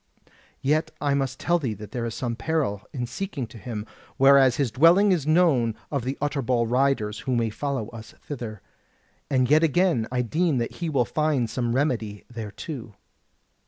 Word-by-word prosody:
Yet 150 Hz, +4 st, +2 dB
I 145 Hz, -1 st, +1 dB
must 135 Hz, -2 st, -1 dB
tell 175 Hz, +1 st, +2 dB
thee 125 Hz, -8 st, -2 dB
that 105 Hz, +1 st, -10 dB
there 120 Hz, -2 st, -3 dB
is 115 Hz, -, -5 dB
some 120 Hz, -2 st, -2 dB
peril 135 Hz, -9 st, -1 dB
in 125 Hz, -3 st, -3 dB
seeking 140 Hz, +1 st, -4 dB
to 115 Hz, 0 st, -12 dB
him; 105 Hz, 0 st, -5 dB, 0.3 s
whereas 135 Hz, -2 st, +6 dB
his 135 Hz, -4 st, 0 dB
dwelling 170 Hz, -, +5 dB
is 160 Hz, -6 st, 0 dB
known 155 Hz, -9 st, +3 dB, 0.2 s
of 140 Hz, -5 st, -1 dB
the 135 Hz, +2 st, -2 dB
Utterbol 130 Hz, -5 st, 0 dB
riders, 120 Hz, -4 st, +1 dB
who 130 Hz, -, -1 dB
may 115 Hz, -2 st, 0 dB
follow 135 Hz, -2 st, -3 dB
us 115 Hz, -1 st, -11 dB
thither. 115 Hz, -8 st, -7 dB, 0.7 s
And 130 Hz, -3 st, +2 dB
yet 155 Hz, +3 st, +5 dB
again 165 Hz, -7 st, +2 dB
I 125 Hz, -1 st, +1 dB
deem 155 Hz, +4 st, +1 dB
that 120 Hz, -1 st, -3 dB
he 170 Hz, -2 st, -2 dB
will 135 Hz, -5 st, +2 dB
find 150 Hz, 0 st, 0 dB
some 120 Hz, +1 st, -2 dB
remedy 115 Hz, -7 st, -1 dB
thereto." 115 Hz, +1 st, -7 dB
130 Hz, 175 wpm, -25 LUFS, 115-150 Hz, 0.7 s, whereas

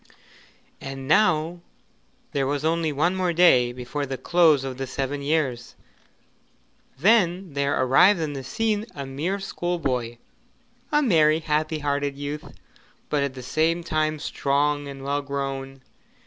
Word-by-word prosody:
And 135 Hz, -1 st, -7 dB
now 170 Hz, -2 st, +2 dB, 0.7 s
there 135 Hz, -2 st, 0 dB
was 145 Hz, +2 st, -2 dB
only 165 Hz, -1 st, +1 dB
one 155 Hz, +6 st, +1 dB
more 180 Hz, -2 st, 0 dB
day 130 Hz, -8 st, +5 dB
before 130 Hz, +4 st, -5 dB
the 135 Hz, 0 st, -4 dB
close 155 Hz, 0 st, +3 dB
of 130 Hz, -2 st, -5 dB
the 135 Hz, -, -3 dB
seven 135 Hz, +2 st, -3 dB
years. 140 Hz, -5 st, -1 dB, 1.2 s
Then 185 Hz, -, +2 dB
there 140 Hz, 0 st, 0 dB
arrived 135 Hz, +10 st, +5 dB
on 155 Hz, -2 st, -2 dB
the 135 Hz, -1 st, -6 dB
scene 215 Hz, -, -1 dB
a 140 Hz, -1 st, -5 dB
mere 155 Hz, +9 st, -3 dB
schoolboy 140 Hz, -11 st, -2 dB, 0.7 s
a 295 Hz, 0 st, +3 dB
merry, 160 Hz, -, +4 dB
happy 155 Hz, 0 st, -1 dB
hearted 145 Hz, -1 st, -2 dB
youth, 145 Hz, +1 st, -6 dB, 0.6 s
but 150 Hz, -, +1 dB
at 140 Hz, -1 st, -2 dB
the 130 Hz, -, -8 dB
same 160 Hz, +6 st, 0 dB
time 155 Hz, -1 st, 0 dB
strong 145 Hz, 0 st, 0 dB
and 135 Hz, -1 st, -8 dB
well 140 Hz, +1 st, -1 dB
grown. 135 Hz, -1 st, -5 dB
145 Hz, 140 wpm, -24 LUFS, 135-165 Hz, 1.2 s, day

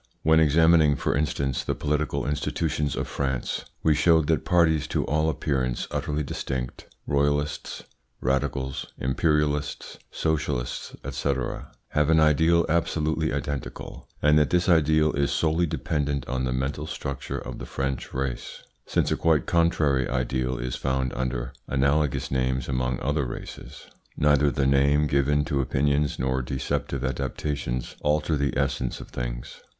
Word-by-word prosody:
When 80 Hz, 0 st, +5 dB
examining, 80 Hz, 0 st, +5 dB
for -, -, -1 dB
instance, 70 Hz, -3 st, -1 dB
the -, -, -1 dB
political 75 Hz, 0 st, -1 dB
institutions 75 Hz, 0 st, -1 dB
of -, -, -2 dB
France 65 Hz, -3 st, -2 dB, 0.2 s
we 80 Hz, -, +5 dB
showed 80 Hz, +1 st, +4 dB
that 80 Hz, -5 st, +2 dB
parties 80 Hz, -4 st, +3 dB
to -, -, -1 dB
all 80 Hz, +2 st, +1 dB
appearance 65 Hz, -4 st, -1 dB
utterly 75 Hz, 0 st, -1 dB
distinct 65 Hz, -2 st, -4 dB, 0.2 s
royalists, 75 Hz, +1 st, -1 dB, 0.4 s
radicals, 65 Hz, 0 st, -1 dB
imperialists, 75 Hz, +2 st, 0 dB
socialists, 75 Hz, -6 st, -2 dB
&c. 70 Hz, -, 0 dB, 0.6 s
have 75 Hz, 0 st, +1 dB
an 80 Hz, -1 st, +5 dB
ideal 80 Hz, +2 st, +4 dB
absolutely 80 Hz, -1 st, 0 dB
identical, 70 Hz, -1 st, -5 dB, 0.2 s
and 75 Hz, +1 st, +6 dB
that 75 Hz, -2 st, +2 dB
this 90 Hz, 0 st, +2 dB
ideal 80 Hz, -2 st, +4 dB
is 70 Hz, 0 st, +1 dB
solely 80 Hz, +2 st, +1 dB
dependent 75 Hz, -3 st, -2 dB
on 65 Hz, 0 st, -1 dB
the 65 Hz, -, -1 dB
mental 70 Hz, +4 st, -2 dB
structure 70 Hz, -3 st, -4 dB
of -, -, -7 dB
the -, -, -7 dB
French 65 Hz, -1 st, -3 dB
race, 65 Hz, -1 st, -4 dB, 0.2 s
since -, -, +1 dB
a -, -, +3 dB
quite 80 Hz, -4 st, +2 dB
contrary 75 Hz, -6 st, +2 dB
ideal 65 Hz, 0 st, -1 dB
is -, -, -3 dB
found 65 Hz, -1 st, -1 dB
under 60 Hz, -1 st, -3 dB
analogous 70 Hz, 0 st, +1 dB
names 65 Hz, -1 st, 0 dB
among 65 Hz, -1 st, -1 dB
other 75 Hz, 0 st, 0 dB
races. -, -, -8 dB, 0.3 s
Neither 75 Hz, -1 st, +4 dB
the 70 Hz, +1 st, 0 dB
name 70 Hz, +2 st, +4 dB
given 75 Hz, +1 st, +2 dB
to 70 Hz, -2 st, 0 dB
opinions 70 Hz, +3 st, +1 dB
nor 65 Hz, +1 st, 0 dB
deceptive 65 Hz, +1 st, -2 dB
adaptations 65 Hz, -1 st, -3 dB
alter 75 Hz, +1 st, +1 dB
the 70 Hz, -1 st, -1 dB
essence 65 Hz, -2 st, -1 dB
of -, -, -10 dB
things. -, -, -6 dB
70 Hz, 140 wpm, -26 LUFS, 65-75 Hz, 0.6 s, and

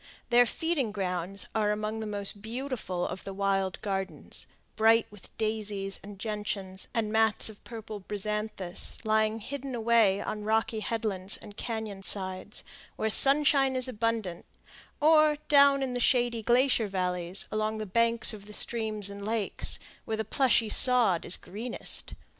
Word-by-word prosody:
Their 245 Hz, 0 st, +6 dB
feeding 315 Hz, -8 st, -1 dB
grounds 190 Hz, -1 st, -4 dB
are 215 Hz, -2 st, +1 dB
among 215 Hz, +1 st, -2 dB
the 220 Hz, -, -4 dB
most 205 Hz, -1 st, -2 dB
beautiful 230 Hz, -6 st, -4 dB
of 185 Hz, -, -6 dB
the 195 Hz, -, -7 dB
wild 195 Hz, -2 st, 0 dB
gardens, 190 Hz, -6 st, -2 dB, 0.3 s
bright 225 Hz, +1 st, +4 dB
with 210 Hz, -2 st, -13 dB
daisies 210 Hz, -3 st, -2 dB
and 200 Hz, 0 st, -11 dB
gentians 205 Hz, -2 st, -4 dB
and 225 Hz, -3 st, -1 dB
mats 220 Hz, 0 st, +3 dB
of 215 Hz, -, -13 dB
purple 220 Hz, -2 st, -8 dB
bryanthus, 210 Hz, -2 st, -3 dB
lying 215 Hz, 0 st, +2 dB
hidden 270 Hz, +3 st, -6 dB
away 225 Hz, -4 st, +3 dB
on 210 Hz, 0 st, -5 dB
rocky 220 Hz, +1 st, 0 dB
headlands 210 Hz, -3 st, -2 dB
and 205 Hz, -2 st, -12 dB
cañon 220 Hz, -4 st, -5 dB
sides, 190 Hz, +1 st, -1 dB, 0.3 s
where 220 Hz, -, -1 dB
sunshine 275 Hz, +1 st, +6 dB
is 255 Hz, 0 st, +2 dB
abundant, 225 Hz, -6 st, -2 dB, 0.5 s
or 305 Hz, -1 st, +5 dB
down 280 Hz, -1 st, +5 dB
in 255 Hz, -2 st, -3 dB
the 245 Hz, -, -2 dB
shady 240 Hz, -2 st, +2 dB
glacier 240 Hz, 0 st, +3 dB
valleys, 180 Hz, -1 st, 0 dB
along 215 Hz, 0 st, -1 dB
the 215 Hz, -, -4 dB
banks 230 Hz, +3 st, +4 dB
of 205 Hz, -1 st, -10 dB
the 210 Hz, -, -9 dB
streams 215 Hz, -3 st, 0 dB
and 200 Hz, 0 st, -7 dB
lakes, 220 Hz, -1 st, 0 dB, 0.3 s
where 220 Hz, -, -3 dB
the 220 Hz, -, -2 dB
plushy 240 Hz, -1 st, +2 dB
sod 225 Hz, -6 st, +3 dB
is 175 Hz, -, +3 dB
greenest. 230 Hz, +6 st, -3 dB
215 Hz, 150 wpm, -28 LUFS, 200-235 Hz, 0.5 s, Their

